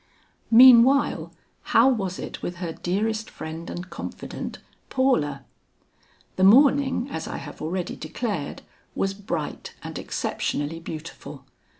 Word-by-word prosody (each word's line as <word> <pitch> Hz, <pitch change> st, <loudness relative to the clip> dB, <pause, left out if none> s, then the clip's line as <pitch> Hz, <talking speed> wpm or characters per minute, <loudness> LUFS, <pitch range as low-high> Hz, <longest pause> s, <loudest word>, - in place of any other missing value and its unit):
Meanwhile 250 Hz, +3 st, +6 dB, 0.5 s
how -, -, +7 dB
was 195 Hz, -8 st, 0 dB
it -, -, -7 dB
with 175 Hz, -, -4 dB
her 170 Hz, -2 st, -5 dB
dearest 215 Hz, +6 st, -2 dB
friend 160 Hz, +2 st, -7 dB
and 175 Hz, +1 st, -6 dB
confident, 170 Hz, -, -6 dB, 0.3 s
Paula? 150 Hz, -, +1 dB, 0.9 s
The 185 Hz, -, +2 dB
morning, 265 Hz, +4 st, +5 dB
as 160 Hz, -, -4 dB
I -, -, -5 dB
have -, -, -9 dB
already 175 Hz, +3 st, -3 dB
declared, 165 Hz, -, -4 dB, 0.3 s
was 195 Hz, 0 st, 0 dB
bright 200 Hz, +1 st, -5 dB
and -, -, -6 dB
exceptionally 145 Hz, +3 st, -3 dB
beautiful. 165 Hz, -1 st, -9 dB
190 Hz, 115 wpm, -25 LUFS, 165-240 Hz, 0.9 s, how